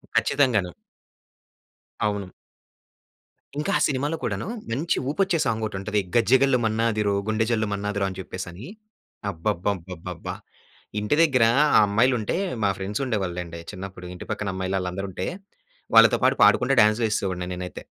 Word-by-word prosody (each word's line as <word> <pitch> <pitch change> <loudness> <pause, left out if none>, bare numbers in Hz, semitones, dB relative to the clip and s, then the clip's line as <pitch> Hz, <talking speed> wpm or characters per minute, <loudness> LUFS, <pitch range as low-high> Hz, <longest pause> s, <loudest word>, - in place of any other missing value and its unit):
ఖచ్చితంగాను. 120 -11 +2 1.3
అవును. 100 -2 -1 1.3
ఇంకా 150 - -1
ఆ - - -2
సినిమాలో 145 +3 -1
కూడాను, - - -2 0.2
మంచి 155 +8 0
ఊపొచ్చే 190 +2 +1
సాంగోటుంటది 105 -2 -1 0.2
'గజ్జగల్లు 130 +3 +4
మన్నాదిరో 110 -2 +1
గుండె 110 0 +1
జల్లు 110 -2 +1
మన్నాదిరో' 100 -1 -1
అని 95 - -8
చెప్పేసని. 90 +4 -7 0.6
అబ్బబ్బబ్బబ్బబ్బబ్బా! 90 -1 -3 0.7
ఇంటి 105 +8 +1
దగ్గర 135 -8 +4 0.3
ఆ - - +8
అమ్మాయిలు 120 +6 +3
ఉంటే 105 - -2 0.3
మా 100 - +3
ఫ్రెండ్స్ 100 +6 -3
ఉండేవాళ్ళండి. 90 -6 -3
చిన్నప్పుడు 95 -2 -8
ఇంటి - - -9
పక్కన 100 -2 -3
అమ్మాయిలు 95 +1 -2
ఆళ్ళందరూ 90 +2 -4
ఉంటే, 90 - -4 0.7
వాళ్ళతో - - +7
పాటు - - +4
పాడుకుంతా 130 +2 +4
డాన్స్ 110 +2 +3
వేసేవాడిని 95 -4 -2
నేనైతే. 90 0 -7
105 Hz, 125 wpm, -24 LUFS, 95-120 Hz, 1.3 s, ఆ